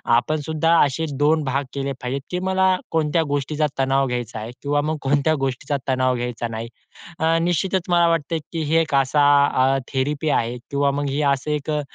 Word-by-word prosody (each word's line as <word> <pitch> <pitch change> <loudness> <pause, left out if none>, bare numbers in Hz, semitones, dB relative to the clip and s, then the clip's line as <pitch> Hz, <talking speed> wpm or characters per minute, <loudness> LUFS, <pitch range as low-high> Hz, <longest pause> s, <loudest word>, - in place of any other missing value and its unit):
आपण 155 +6 +1
सुद्धा 160 +1 +2
असे 150 +4 -2
2 155 +1 +3
भाग 135 +1 -1
केले 140 0 -2
पाहिजेत, 130 +2 -3
की 180 - -1
मला 190 0 +3 0.2
कोणत्या 160 +1 +1
गोष्टीचा 145 +2 0
तणाव 135 0 +2
घ्यायचा 120 -2 -4
आहे 110 +3 -6
किंवा 145 0 0
मग 155 +1 -2
कोणत्या 145 +3 +2
गोष्टीचा 135 +1 -2
तणाव 130 -1 +2
घ्यायचा 120 -1 -3
नाही. 115 0 -6 0.5
अ, 165 +1 +2
निश्चितच 180 +2 0
मला 170 -1 +4
वाटते, 165 0 0
की 165 -2 -3
ही 150 +2 0
एक 155 -3 -1
असा 140 +2 +3 0.4
अ, 135 +1 +3 0.2
थेरपी 145 +3 -1
आहे 120 -2 0
किंवा 140 0 +2
मग 145 0 -2 0.2
असं 140 +3 -4
एक 150 0 -3
अ, 150 -1 0
145 Hz, 185 wpm, -22 LUFS, 135-160 Hz, 0.5 s, मला